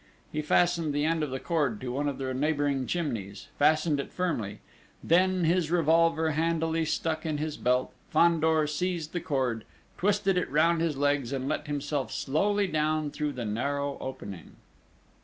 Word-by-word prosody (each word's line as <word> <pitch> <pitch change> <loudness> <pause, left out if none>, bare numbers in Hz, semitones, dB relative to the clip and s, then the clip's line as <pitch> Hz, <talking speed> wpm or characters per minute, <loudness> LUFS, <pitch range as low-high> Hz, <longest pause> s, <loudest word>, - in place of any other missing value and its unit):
He 150 - -2
fastened 165 0 +2
the 145 +1 +1
end 165 0 +1
of 150 - -1
the 130 0 -4
cord 145 -11 0
to 125 -1 -4
one 145 +3 -1
of 140 - -5
the 130 -1 -3
neighbouring 140 -1 0
chimneys 115 - -3
fastened 155 0 +3
it 140 - -5
firmly; 140 - -2 0.5
then, 185 +2 +3
his 170 0 +2
revolver 165 -1 +3
handily 165 +1 0
stuck 160 +1 -1
in 155 -2 -2
his 155 0 -3
belt, 125 +1 0 0.2
Fandor 160 -1 +3
seized 165 +1 -2
the 175 - -2
cord, 130 -7 -1 0.4
twisted 195 -1 +2
it - - -3
round 165 +4 +3
his 160 -4 0
legs, 145 -3 +1
and 135 -1 -2
let 150 +1 -2
himself 145 -4 -2
slowly 205 +8 +1
down 155 -3 0
through 150 -1 -2
the 125 -3 -4
narrow 140 +6 -2
opening. 100 -10 -8
150 Hz, 165 wpm, -28 LUFS, 140-165 Hz, 0.5 s, fastened